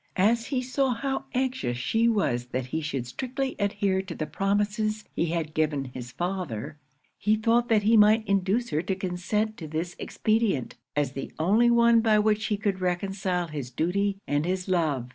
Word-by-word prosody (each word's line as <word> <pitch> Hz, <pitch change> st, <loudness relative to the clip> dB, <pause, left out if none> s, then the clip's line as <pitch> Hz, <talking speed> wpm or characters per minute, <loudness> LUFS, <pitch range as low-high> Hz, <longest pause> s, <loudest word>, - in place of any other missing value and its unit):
As 225 Hz, +5 st, +3 dB
he 255 Hz, -3 st, -1 dB
saw 255 Hz, 0 st, 0 dB
how 270 Hz, +2 st, -2 dB
anxious 255 Hz, -, -1 dB
she 225 Hz, -, +1 dB
was 125 Hz, -, 0 dB
that 130 Hz, 0 st, -3 dB
he 160 Hz, +6 st, -3 dB
should 140 Hz, -5 st, -3 dB
strictly 260 Hz, -, -3 dB
adhere 200 Hz, -2 st, +1 dB
to 185 Hz, -3 st, -8 dB
the 155 Hz, -, -3 dB
promises 210 Hz, +3 st, 0 dB
he 170 Hz, -, 0 dB
had 160 Hz, -2 st, -2 dB
given 150 Hz, -3 st, 0 dB
his 125 Hz, -1 st, -7 dB
father, 155 Hz, -, -4 dB, 0.4 s
he 210 Hz, +2 st, +3 dB
thought 235 Hz, +3 st, +2 dB
that 215 Hz, -2 st, +3 dB
he 220 Hz, +2 st, +4 dB
might 215 Hz, +1 st, +5 dB
induce 200 Hz, +5 st, +1 dB
her 150 Hz, -, +1 dB
to 190 Hz, +2 st, -2 dB
consent 195 Hz, +4 st, -2 dB
to 160 Hz, -, -7 dB
this 160 Hz, +3 st, -3 dB
expedient, 215 Hz, -, 0 dB, 0.2 s
as 145 Hz, -3 st, +1 dB
the 135 Hz, 0 st, -6 dB
only 210 Hz, +9 st, +4 dB
one 235 Hz, -1 st, +5 dB
by 220 Hz, -2 st, +4 dB
which 210 Hz, 0 st, +2 dB
he 210 Hz, -2 st, 0 dB
could 200 Hz, -2 st, -1 dB
reconcile 180 Hz, -1 st, -1 dB
his 145 Hz, -5 st, -5 dB
duty 195 Hz, +9 st, 0 dB
and 145 Hz, +1 st, 0 dB
his 185 Hz, +2 st, -2 dB
love. 155 Hz, -9 st, 0 dB
195 Hz, 180 wpm, -27 LUFS, 155-220 Hz, 0.4 s, might